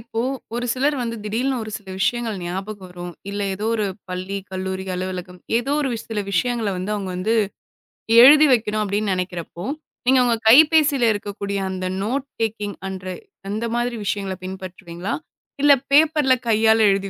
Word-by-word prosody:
இப்போ 225 0 -4 0.3
ஒரு 240 +1 -2
சிலர் 285 +3 +1
வந்து 230 -1 -3
திடீர்னு 245 +5 -1
ஒரு 215 - -6
சில 205 - -26
விஷயங்கள் 225 -1 0
ஞாபகம் 190 +2 -5
வரும். 175 0 -7 0.2
இல்ல 205 0 -4
ஏதோ 210 +3 -4
ஒரு 215 -2 0 0.2
பள்ளி, 185 +2 -4
கல்லூரி, 190 0 -4
அலுவலகம். 180 0 -5 0.2
ஏதோ 260 +4 -2
ஒரு 275 -3 0 0.2
சில 215 -2 -2
விஷயங்கள 235 +3 0
வந்து 185 +3 -3
அவங்க 195 -3 -4
வந்து 205 +5 0 0.9
எழுதி 295 +4 +9
வைக்கணும் 215 -2 +1
அப்டின்னு 205 0 -1
நெனைக்கிறப்போ 180 -2 -4 0.4
நீங்க 260 0 +6
உங்க 235 -1 +3
கைபேசியில 295 +1 +6
இருக்கக்கூடிய 200 -1 -4
அந்த 185 0 -4 0.2
நோட் 260 +6 -1 0.2
டேக்கிங்ன்ற 200 0 -5
மாரி 240 0 -1
விஷயங்கள 195 -1 -2
பின்பற்றுவீங்களா? 185 -2 -6 0.5
இல்ல 290 0 +7 0.2
பேப்பர்ல 300 -2 +5
கையால 220 0 +4
எழுதி 195 0 -1
210 Hz, 145 wpm, -22 LUFS, 190-240 Hz, 0.9 s, எழுதி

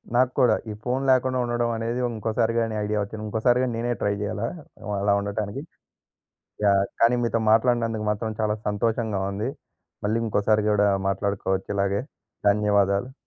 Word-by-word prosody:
నాక్కూడా 125 -2 +4 0.2
ఈ - - -4
ఫోను 130 +2 -1
లేకుండా 130 0 +2
ఉండడం 120 0 0
అనేది 115 +2 -2 0.2
ఇంకోసారి 115 +2 0
గాని 115 -1 -1
ఐడియా 105 0 -1
ఒచ్చింది. 105 +2 -7
ఇంకోసారి 115 +3 +2
గాని 125 -2 -1
నేనే 120 +1 -1
ట్రై 100 - +1
జేయాలా 105 +2 -2 0.5
అలా 100 0 +3
ఉండటానికి. 100 +5 -3 1.0
యాహ్! 100 -1 +4 0.2
కానీ 115 +2 +5
మీతో 115 0 +1
మాట్లాడినందుకు 115 -1 +2
మాత్రం 110 +1 -3
చాలా 105 -1 +1
సంతోషంగా 110 -1 0
ఉంది. 105 +6 -2 0.6
మళ్ళీ 110 +2 +1
ఇంకోసారి 105 0 +2
గూడా 105 -1 +3 0.2
మాట్లాడుకోవచ్చు 95 -1 -1
ఇలాగే. 100 0 +1 0.5
ధన్యవాదాలు. 100 +3 +2
110 Hz, 140 wpm, -25 LUFS, 100-120 Hz, 1.0 s, కానీ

